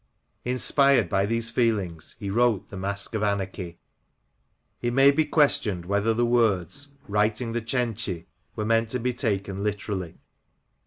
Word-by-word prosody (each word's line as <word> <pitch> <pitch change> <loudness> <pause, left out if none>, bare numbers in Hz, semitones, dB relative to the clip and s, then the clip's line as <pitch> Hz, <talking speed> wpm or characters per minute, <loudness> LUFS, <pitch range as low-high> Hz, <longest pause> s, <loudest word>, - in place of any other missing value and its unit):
Inspired 130 - +3
by 95 +2 +1
these 115 +1 -1
feelings 100 -9 -1
he 100 -3 -4
wrote 110 -3 +1
the - - -9
Masque 100 +2 -3
of 110 - -1
Anarchy. 95 -4 -2 0.5
..." - - -47
It 120 0 -1
may 135 +2 +6
be 155 +2 +1
questioned 120 - +2
whether 100 +4 +1
the 120 +2 +1
words 120 +4 +1
'* - - -29
writing 105 +3 0
The 120 +1 -2
Cenci" 115 -7 -2 0.3
were 105 - -2
meant 115 0 +2
to 125 - -2
be 125 +1 -1
taken 100 -5 -2
literally. 100 -4 -3
110 Hz, 155 wpm, -25 LUFS, 100-120 Hz, 0.5 s, may